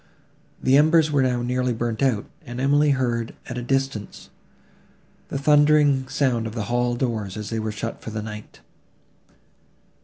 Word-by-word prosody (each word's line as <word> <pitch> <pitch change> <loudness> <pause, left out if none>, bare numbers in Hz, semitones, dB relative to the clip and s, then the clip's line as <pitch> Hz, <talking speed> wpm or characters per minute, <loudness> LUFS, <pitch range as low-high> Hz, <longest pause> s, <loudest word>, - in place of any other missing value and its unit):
The 130 +1 +4
embers 155 +1 +4
were 145 -2 +3
now 125 -2 0
nearly 125 0 0
burnt 115 0 -3
out; 125 -7 +1 0.2
and 120 +1 -7
Emily 145 +3 +3
heard, 120 -4 -1
at 120 0 -5
a - - -4
distance, 135 -4 -3 1.0
the - - -4
thundering 145 -1 +4
sound 130 -5 0
of 110 - -8
the 110 - -2
hall 120 0 +1
doors, 110 -6 -3
as 105 0 -6
they 115 - -1
were 110 0 -2
shut 110 +2 -5
for - - -7
the 110 -1 -4
night. 105 -1 -9
125 Hz, 160 wpm, -23 LUFS, 115-140 Hz, 1.0 s, The